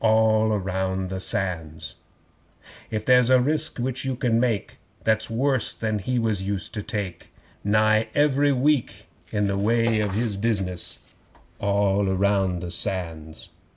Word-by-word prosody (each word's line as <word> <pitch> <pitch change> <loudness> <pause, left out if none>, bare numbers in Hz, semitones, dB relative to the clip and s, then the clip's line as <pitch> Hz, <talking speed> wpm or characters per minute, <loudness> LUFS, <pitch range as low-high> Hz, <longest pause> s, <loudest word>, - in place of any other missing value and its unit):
(All 110 -1 +3
round 95 -1 -2
the 95 0 -4
Sands!) 80 -5 -2 1.0
'If 110 -1 -3
there's 125 -1 +5
a 130 -1 +6
risk 155 +4 0
which 130 +1 -2
you 135 -1 -2
can 120 -2 +1
make 115 -5 -1 0.2
That's 110 0 +1
worse 130 +2 +2
than 110 -1 -2
he 125 +6 -2
was 110 -4 0
used 100 0 -1
to 105 - -3
take 100 -3 -5 0.3
Nigh 110 +1 +3
every 145 0 +3
week 140 0 0 0.3
in 105 -1 0
the 100 0 -1
way 115 +1 +2
of 105 -2 -1
his 110 -2 -1
business; 100 -5 -1 0.6
(All 100 0 +1
round 95 -2 +1
the 85 - -5
Sands!) 85 -5 -3
105 Hz, 145 wpm, -24 LUFS, 95-115 Hz, 1.0 s, a